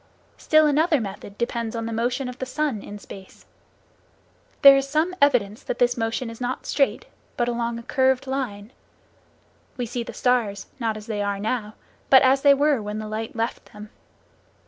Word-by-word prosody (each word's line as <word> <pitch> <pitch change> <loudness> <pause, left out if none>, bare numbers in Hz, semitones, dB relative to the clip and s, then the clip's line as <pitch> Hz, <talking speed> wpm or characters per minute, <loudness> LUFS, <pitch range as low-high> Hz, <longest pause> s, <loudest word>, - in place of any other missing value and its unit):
Still 310 0 +4
another 305 +1 +3
method 200 -1 -7
depends 235 -1 -3
on 230 0 -3
the 230 - -4
motion 245 +4 -1
of 250 0 -8
the 260 - -3
sun 275 -5 -2
in 205 - -9
space. 195 -2 -13 1.2
There 275 0 +11
is 275 0 0
some 315 +5 +1
evidence 235 -7 +2
that - - -4
this 245 0 +2
motion 225 +1 -2
is 230 - -12
not 250 +1 -3
straight, 275 -2 0 0.3
but 240 - +1
along 235 -1 -2
a 235 - -8
curved 265 0 +1
line. 245 -6 -4 1.1
We 245 - -2
see 240 +1 -4
the 235 - -6
stars, 225 -6 0
not 225 -3 -1
as 210 - -10
they 215 -3 -3
are 200 0 -1
now, 215 0 -3 0.3
but 265 0 +7
as 265 +1 +4
they 280 0 +6
were 285 -3 +2
when 210 0 -5
the 215 0 -5
light 220 +2 -5
left 230 +1 -4
them. 210 +1 -11
240 Hz, 185 wpm, -23 LUFS, 215-265 Hz, 1.2 s, There